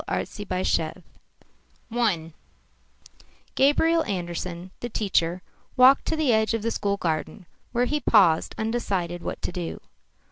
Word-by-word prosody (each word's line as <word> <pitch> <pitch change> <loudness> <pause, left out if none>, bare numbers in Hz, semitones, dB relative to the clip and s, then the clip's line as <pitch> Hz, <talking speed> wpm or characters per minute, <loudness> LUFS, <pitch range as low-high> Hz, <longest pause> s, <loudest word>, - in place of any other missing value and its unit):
ARTZYBASHEV 185 -4 -2 0.9
I 185 -9 0 1.2
Gabriel 320 +4 +3
Andersen, 175 -1 -4
the 240 - -5
teacher, 185 -5 0 0.3
walked 260 +2 +6
to 320 - 0
the 305 -6 +2
edge 220 +1 +2
of 225 - -3
the 230 - 0
school 200 -2 -1
garden, 170 +2 -3 0.3
where 245 0 +1
he 300 +4 0
paused, 190 - +3
undecided 195 -6 -2
what - - -6
to - - -2
do. 175 -2 -5
200 Hz, 120 wpm, -25 LUFS, 175-240 Hz, 1.2 s, walked